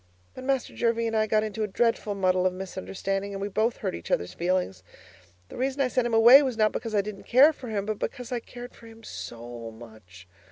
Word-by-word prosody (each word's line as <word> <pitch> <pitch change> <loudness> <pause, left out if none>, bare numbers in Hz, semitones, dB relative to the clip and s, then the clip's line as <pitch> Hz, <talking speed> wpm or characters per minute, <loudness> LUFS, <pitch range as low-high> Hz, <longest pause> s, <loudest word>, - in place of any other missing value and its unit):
But 255 - -9
Master 270 -2 -1
Jervie 230 -1 +1
and 225 0 -1
I 215 0 +2
got 215 0 +2
into 215 0 -4
a 215 - 0
dreadful 215 0 0
muddle 185 -1 +2
of 185 - -2
misunderstanding 195 +1 -4
and 195 - -5
we 200 +1 -3
both 220 +4 0
hurt - - 0
each 85 0 -8
other's 90 - -1
feelings. 175 - -1 0.7
The - - -10
reason 265 +2 -1
I 265 -2 +2
sent 250 -1 +1
him 235 - -4
away 240 +5 +9
was 260 -5 -2
not 215 -1 +3
because 225 -2 -4
I 205 - +4
didn't 200 0 -8
care 275 +6 +6
for 255 - -10
him, 205 -2 -2
but 215 -1 -3
because 250 -1 -5
I 245 - -1
cared 245 +1 -10
for 230 - -15
him 225 0 -15
so 120 - -8
much. 110 -5 -14
215 Hz, 235 wpm, -26 LUFS, 185-235 Hz, 0.7 s, away